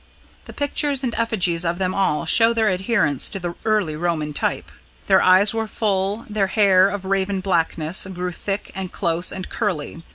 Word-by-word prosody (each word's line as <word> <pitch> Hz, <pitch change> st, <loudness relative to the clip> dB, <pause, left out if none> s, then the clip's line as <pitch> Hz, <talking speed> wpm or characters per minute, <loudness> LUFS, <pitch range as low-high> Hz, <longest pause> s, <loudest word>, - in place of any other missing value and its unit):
The -, -, -10 dB
pictures 285 Hz, -1 st, 0 dB
and 240 Hz, -3 st, -1 dB
effigies 190 Hz, -7 st, 0 dB
of 170 Hz, 0 st, -1 dB
them 185 Hz, 0 st, -1 dB
all 150 Hz, -7 st, 0 dB
show 225 Hz, +7 st, +4 dB
their 220 Hz, -2 st, +2 dB
adherence 185 Hz, -, +1 dB
to 195 Hz, -, -6 dB
the 175 Hz, -1 st, -4 dB
early 210 Hz, -8 st, +1 dB
Roman 155 Hz, -2 st, -2 dB
type. -, -, -2 dB, 0.3 s
Their -, -, +4 dB
eyes 190 Hz, +3 st, +5 dB
were 225 Hz, -1 st, -2 dB
full; 200 Hz, +1 st, -1 dB
their 210 Hz, -2 st, 0 dB
hair, 195 Hz, -1 st, +4 dB
of 200 Hz, -1 st, -5 dB
raven 195 Hz, 0 st, 0 dB
blackness, 170 Hz, -2 st, 0 dB
grew 180 Hz, 0 st, -4 dB
thick 195 Hz, +3 st, -5 dB
and 190 Hz, -1 st, -5 dB
close 170 Hz, -1 st, -1 dB
and 185 Hz, -1 st, -6 dB
curly. 170 Hz, -7 st, -3 dB
190 Hz, 175 wpm, -21 LUFS, 175-210 Hz, 0.3 s, eyes